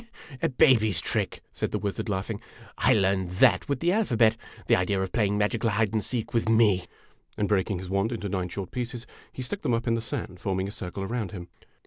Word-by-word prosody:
"A 165 - +2
baby's 120 - +4
trick!'' - - -2
said - - -2
the - - -1
wizard, 100 +1 -3
laughing. 100 +2 -3 0.3
"I - - +3
learned 95 -3 +1
that 90 - +4
with 140 -2 -1
the 175 - +3
alphabet. 120 - +3 0.3
The - - +4
idea 95 +2 0
of 95 -1 -2
playing 105 -3 +1
magical 110 +2 +1
hide 110 0 +1
and 110 -2 +1
seek 120 -4 -2
with 115 -1 +1
me! 105 -5 +4 0.2
" - - -37
and 105 - +1
breaking 100 -1 +1
his 90 +1 -7
wand 100 +4 0
into 110 -4 -3
nine 95 -2 -2
short 95 0 -6
pieces, 120 -1 -4 0.3
he 130 - -6
stuck 200 +11 -4
them 120 - +1
up 115 - -2
in 115 - +2
the 115 - 0
sand, 90 -4 -5
forming 95 +1 -1
a - - -5
circle 95 0 -6
around 110 -2 -3
him. 90 -3 -8
105 Hz, 220 wpm, -27 LUFS, 95-115 Hz, 0.3 s, baby's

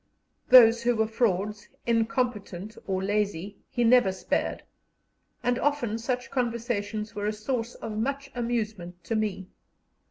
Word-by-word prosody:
Those 235 -2 +8
who 240 0 +2
were 220 0 +2
frauds, 210 -2 -1 0.2
incompetent, 225 -4 -1
or 190 -1 -1
lazy, 205 -1 -1
he 240 - 0
never 235 -4 +5
spared, 190 - -2 0.8
and 245 0 +1
often 245 -7 0
such 250 +1 -3
conversations 230 -3 -2
were 205 -1 -3
a - - +1
source 225 +2 -3
of 220 -2 -6
much 275 +3 -2
amusement 215 -8 -3
to 225 - -2
me. 210 -4 -2
225 Hz, 130 wpm, -27 LUFS, 205-240 Hz, 0.8 s, Those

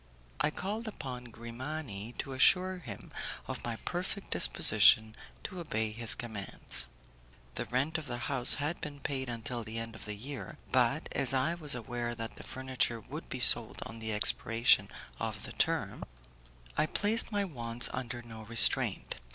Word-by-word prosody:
I 150 - +3
called 210 +8 -4
upon 125 -11 -7
Grimani 120 -1 -7
to 135 - -5
assure 180 +7 +4
him 110 - -9 0.4
of - - -6
my - - -3
perfect - - -4
disposition 110 0 +5 0.3
to 185 - -6
obey 110 -10 -2
his 115 0 +4
commands. 110 -5 +2 0.7
The - - -5
rent 135 +7 -1
of 150 - -10
the 120 -1 -4
house 135 -4 +5
had 150 +4 -3
been 145 -2 -7
paid 130 -2 -3
until 120 0 -5
the 110 +1 -7
end 115 0 -5
of 110 - -11
the 105 -1 -5
year; 120 -1 -8
but, - - +2
as 135 0 +1
I 135 +6 +1
was 155 -6 -3
aware 120 0 -4
that 115 -1 -6
the - - -11
furniture 130 -3 -1
would 110 - -9
be - - -5
sold - - +3
on 115 - -9
the 110 0 -4
expiration 115 +2 +3 0.3
of - - -4
the - - -6
term, - - -1 0.7
I - - +1
placed 215 +6 +1
my 205 -1 0
wants 120 -7 -1
under 120 -1 -5
no 110 -2 -10
restraint. 115 0 +5
120 Hz, 165 wpm, -31 LUFS, 115-145 Hz, 0.7 s, disposition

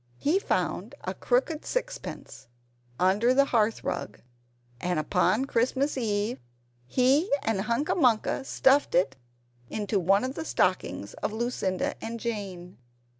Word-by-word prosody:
He 320 - +2
found - - -2
a - - -3
crooked 420 -11 0
sixpence - - -5 0.5
under 205 +7 +3
the 280 +1 +5
hearth 225 -4 +1
rug; - - -4 0.6
and 180 +2 -1
upon 180 - +2
Christmas 265 +3 +1
Eve, 215 -2 -1 0.5
he 265 - +3
and 220 -3 0
Hunca 235 - 0
Munca 250 -6 +2
stuffed 270 +1 +3
it 155 -7 +2 0.5
into 205 -1 -1
one 195 +4 +3
of 260 +1 -2
the 320 - -4
stockings - - 0
of - - -1
Lucinda 220 -5 -2
and 230 +1 -4
Jane. 195 - -5
230 Hz, 125 wpm, -27 LUFS, 200-270 Hz, 0.6 s, the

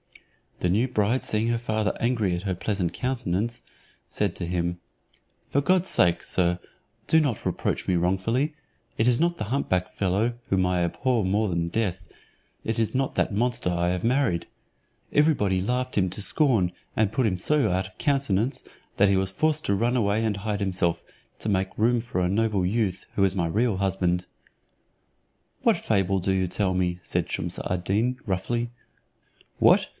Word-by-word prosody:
The 90 - +1
new 110 +8 +2
bride 120 +1 +1
seeing 110 +1 0
her 120 0 +1
father 110 -2 -1
angry 115 -6 +1
at 85 - -5
her 95 -2 -1
pleasant 95 -1 -2
countenance, 120 -3 -2 0.5
said 100 -4 -1
to 90 - -4
him, 85 0 -2 0.7
"For 140 - +2
God's 185 +5 +2
sake, 85 -1 +3
sir, 90 -1 0 0.5
do 160 - +5
not 140 -8 -1
reproach - - -2
me 90 - +2
wrongfully; 105 - 0 0.4
it 110 - +2
is 120 -1 +3
not 170 +1 +1
the - - -3
hump 135 +7 -2
back 90 0 0
fellow, 100 +5 0 0.2
whom 95 -1 +2
I 90 -1 +1
abhor 120 +6 0
more 105 +3 +1
than 85 -1 -1
death, 95 -2 -2 0.6
it 110 - -2
is 115 -2 0
not 135 0 -1
that - - +1
monster 120 -2 0
I 85 0 0
have 90 0 -2
married. 125 -8 +1 0.6
Every 150 +2 +4
body 95 -8 0
laughed 125 +5 -2
him 95 -2 +3
to 105 - -5
scorn, 110 - +3 0.2
and 110 -2 +2
put 125 +3 +1
him 90 -3 -1
so 150 +2 +2
out 95 +1 0
of 95 - -19
countenance, 135 -4 0 0.3
that 100 0 +5
he 100 - +3
was 95 0 0
forced 155 +7 +1
to 100 - +2
run 120 +5 +1
away 110 -2 +1
and 110 -3 0
hide 105 0 -2
himself, 90 -4 0 0.4
to 110 - -3
make 95 -1 0
room 115 +2 +3
for 115 -6 -3
a 90 - +1
noble 105 -2 +1
youth, 100 -2 -1
who 100 - +2
is 95 0 +2
my 85 -3 0
real 105 +4 +1
husband." 90 -2 0 1.4
"What - - +4
fable 95 0 +1
do 95 +2 0
you 95 -1 +1
tell 95 +1 0
me?" 90 -1 0
said - - -1
Shumse - - -2
ad 90 -1 -2
Deen, 115 +7 0
roughly. 115 +5 -1 0.9
"What! - - +5
100 Hz, 180 wpm, -26 LUFS, 90-120 Hz, 1.4 s, do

